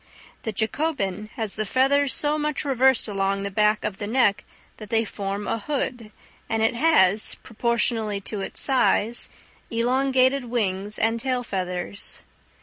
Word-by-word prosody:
The 220 - -3
Jacobin 215 - -2
has 220 -3 -1
the 215 - -2
feathers 270 +5 +2
so 295 +5 +2
much 300 0 -2
reversed 265 -3 +3
along 195 -1 -1
the 200 - -3
back 210 +1 +2
of 200 -2 -4
the 205 - -4
neck 220 -3 +2 0.3
that 215 -2 -10
they 225 0 +2
form 200 0 -4
a 230 - -1
hood, 245 -3 -3 0.4
and 225 0 0
it 225 - +3
has, 230 - +4
proportionally 225 -2 0
to 200 0 -4
its - - -5
size, 240 -4 +1 0.4
elongated 260 +2 +2
wing 205 -4 -1
and 225 +1 +1
tail 255 0 -1
feathers. 185 -2 -2
225 Hz, 145 wpm, -24 LUFS, 205-260 Hz, 0.4 s, has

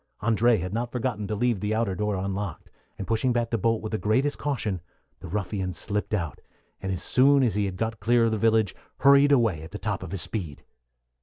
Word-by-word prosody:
André 115 0 +3
had 90 +2 -4
not 120 +1 -2
forgotten 120 -5 -2
to 105 - -2
leave 120 -1 +1
the 105 +2 -1
outer 110 -4 0
door 105 +2 -1
unlocked, 95 0 -4 0.3
and 100 - -5
pushing 115 +5 +1
back 120 -1 0
the 115 - +1
bolt 115 +2 +1
with 110 - -4
the 110 - -1
greatest 130 +7 +1
caution, 110 - -2 0.4
the 90 - -9
ruffian 95 0 -3
slipped 105 +3 -2
out, 85 -6 -4 0.4
and 95 - -3
as 90 -2 -2
soon 135 +1 +4
as 115 -6 +2
he 105 0 0
had 95 -2 -3
got 110 +2 -2
clear 120 +2 +3
of 115 - +1
the 110 - 0
village 110 -2 +3 0.3
hurried 140 +1 +6
away 115 - +3
at 80 - -9
the 105 - -6
top 105 -2 -3
of 95 -3 -7
his 95 -5 -2
speed. 85 -10 -5
110 Hz, 225 wpm, -26 LUFS, 95-120 Hz, 0.4 s, hurried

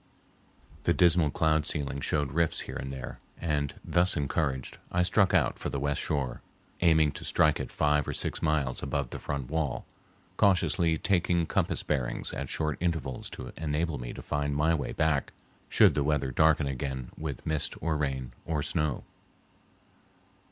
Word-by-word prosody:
The - - +2
dismal 85 -3 +4
cloud 80 0 +2
ceiling 70 -3 -2
showed 75 -2 0
rifts 85 +2 +1
here - - -7
and 65 - -4
there, 65 -2 -7 0.2
and, 75 -4 -1
thus 90 0 +2
encouraged, 70 -3 -1
I 90 0 +2
struck 95 +1 +3
out - - +2
for - - -3
the 70 - -3
west 70 0 0
shore, 65 -5 -2 0.4
aiming 80 -3 +5
to - - -9
strike - - +3
it - - -4
five 75 -1 +2
or - - -2
six - - -3
miles 75 -5 0
above 70 -3 -2
the - - -5
front 70 -2 -4
wall, 75 -6 -1 0.5
cautiously 85 -4 +3
taking 85 -2 +2
compass - - 0
bearings 65 -5 -1
at 70 0 -4
short 75 -2 -1
intervals 80 -7 -2
to 60 - -8
enable 80 -1 -1
me - - -5
to - - -8
find 75 -1 -1
my 75 +3 +3
way 75 -4 -2
back 80 -3 +1 0.4
should - - +6
the 75 - +1
weather 70 -2 0
darken 80 +2 +4
again 65 -2 -4
with 75 -5 -5
mist 80 -2 -1
or 80 0 0
rain 70 -4 -2
or 75 -3 -1
snow. 75 -4 -1
75 Hz, 165 wpm, -29 LUFS, 70-80 Hz, 0.5 s, should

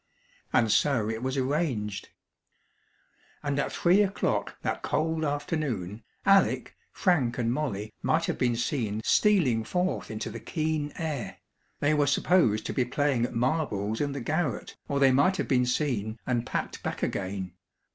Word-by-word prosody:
And 115 -3 +3
so 125 -6 +2
it 110 0 -4
was 130 +1 -2
arranged. 130 - -1 1.3
And 145 -1 -1
at - - -1
three 180 +4 +4
o'clock 200 -1 -1
that - - -2
cold 160 0 0
afternoon 145 - -2 0.2
Alec, 195 0 +3 0.2
Frank, 145 - +1
and 120 -1 0
Molly 110 -8 -3
might 165 +1 +2
have - - -2
been 120 -2 +2
seen 115 -4 -1
stealing 160 - +3
forth 180 +9 -1
into 110 -1 -4
the - - -6
keen 155 -2 -2
air; 155 -8 -4 0.4
they 145 +1 +3
were 145 -1 +2
supposed 140 - +3
to - - -3
be 130 - +2
playing 125 -1 +1
at - - -6
marbles 115 -5 0
in 145 -1 0
the 140 - -4
garret 145 -1 -2
or 140 - 0
they 135 -1 +6
might 145 +9 +3
have - - -2
been 125 -2 +2
seen, 120 -5 -1
and 120 -2 -1
packed - - -3
back - - -4
again. 95 -2 -3
135 Hz, 155 wpm, -28 LUFS, 115-155 Hz, 1.3 s, they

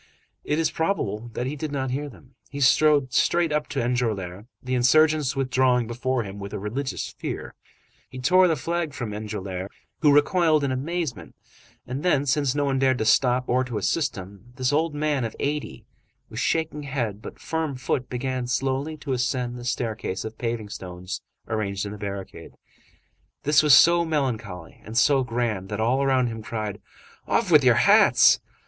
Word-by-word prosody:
It 150 - -1
is 165 -1 +1
probable 120 - -2
that 120 - -3
he 135 +3 -3
did 150 0 -5
not 135 -2 -2
hear 145 +3 -3
them. 130 +1 -17 0.2
He 140 - -7
strode 140 -1 +4
straight 170 +3 +2
up 150 0 0
to 140 - -3
Enjolras, 110 -5 -2
the 130 0 -5
insurgents 150 +3 +3
withdrawing 130 -2 +2
before 120 +2 -2
him 100 0 -8
with 100 0 -7
a - - -4
religious 130 +7 -4
fear; - - -5 0.6
he 130 - -10
tore 180 +9 +4
the 165 - +2
flag 165 +1 -3
from 120 -4 -4
Enjolras, 100 -3 -5 0.3
who 150 -3 +5
recoiled 155 +1 +3
in 140 - 0
amazement 135 - -4 0.5
and 130 +3 -4
then, 150 -5 +2
since 140 -1 +1
no 145 -1 +1
one 135 -1 0
dared 130 -1 +3
to 110 - -1
stop 125 +2 +3
or 125 +1 +2
to 125 -3 -5
assist 145 - 0
him, 100 +5 -11
this 130 +1 0
old 155 +1 +1
man 145 -3 0
of 115 - -4
eighty, 145 -5 -3 0.5
with 110 - -5
shaking 160 +1 -1
head 120 -7 -3
but - - -9
firm 160 -3 -3
foot, 130 0 -2
began 125 0 -3
slowly 135 +4 -1
to 145 -2 -4
ascend 125 -1 -1
the 120 - -8
staircase 115 -6 -3
of 110 0 -6
paving 115 -3 -3
stones 90 -1 -7 0.3
arranged 100 -2 -2
in 100 - -5
the 105 - -8
barricade. 100 -1 -7 0.9
This 150 +1 +4
was 150 -3 +7
so 170 +2 +6
melancholy 115 - -3
and 110 +2 -6
so 135 +2 +4
grand 115 -6 -2
that 105 0 -4
all 120 +5 +2
around 135 -2 +2
him 115 -2 -4
cried: 105 -2 -5 0.5
"Off - - +1
with - - +7
your - - +5
hats!" - - +6
130 Hz, 180 wpm, -24 LUFS, 110-145 Hz, 0.9 s, was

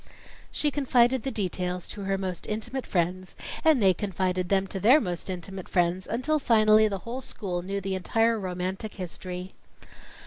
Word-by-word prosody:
She 295 - 0
confided 260 -3 +3
the 270 - -2
details 180 -5 -2
to 200 -2 -5
her 195 0 0
most 185 -3 -4
intimate 225 +5 -3
friends, 180 +1 -1 0.3
and 315 -4 +5
they 190 -1 +6
confided 185 -2 -1
them 195 -1 +2
to 195 0 -4
their 245 +10 +6
most 180 - -3
intimate 185 +1 -6
friends, 180 +1 +1
until 280 +7 0
finally, 215 -4 +5
the 200 -2 -2
whole 245 +3 -4
school 185 -8 -4
knew 195 +2 -3
the 195 0 -3
entire 225 +4 +1
romantic 185 +2 -4
history. 180 0 -6
195 Hz, 165 wpm, -27 LUFS, 180-225 Hz, 0.3 s, they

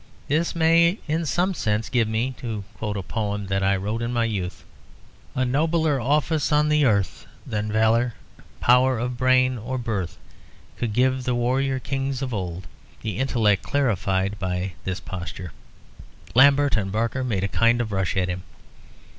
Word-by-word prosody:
This 160 +4 0
may 170 +3 +4
in 160 +1 -1
some 180 +5 +1
sense 105 -7 -1
give 115 -3 +1
me, 115 +4 -1
to 110 -4 -4
quote 105 -2 -3
a 95 - -4
poem 105 0 -3
that 95 0 -1
I 95 0 +3
wrote 105 +4 -3
in 115 +1 -2
my 120 -1 +1
youth 95 -5 -4 0.7
A 130 - +1
nobler 155 +1 +1
office 150 +5 +1
on 150 0 +3
the 150 -1 +3
earth 100 -6 0 0.2
Than 105 0 -3
valour, 110 +2 +2 0.4
power 125 +1 +4
of 125 +2 -2
brain, 130 0 +3
or 130 +4 -4
birth 105 -8 -3 0.6
Could 115 -3 -2
give 130 +2 +2
the 125 -2 +1
warrior 130 +3 +1
kings 135 0 -3
of 130 -2 -4
old. 90 -3 -4 0.4
The 110 -1 -3
intellect 115 -7 +2
clarified 100 -7 0
by 90 -1 -2
this 95 0 -2
posture 90 -1 -7 0.4
" - - -19
Lambert 140 +2 +5
and 95 -3 -1
Barker 115 +5 -1
made 110 -7 -1
a - - +1
kind 115 +3 +2
of 115 -3 -2
rush 95 -1 -1
at 90 -1 +1
him. 90 0 -3
115 Hz, 170 wpm, -24 LUFS, 100-135 Hz, 0.7 s, Lambert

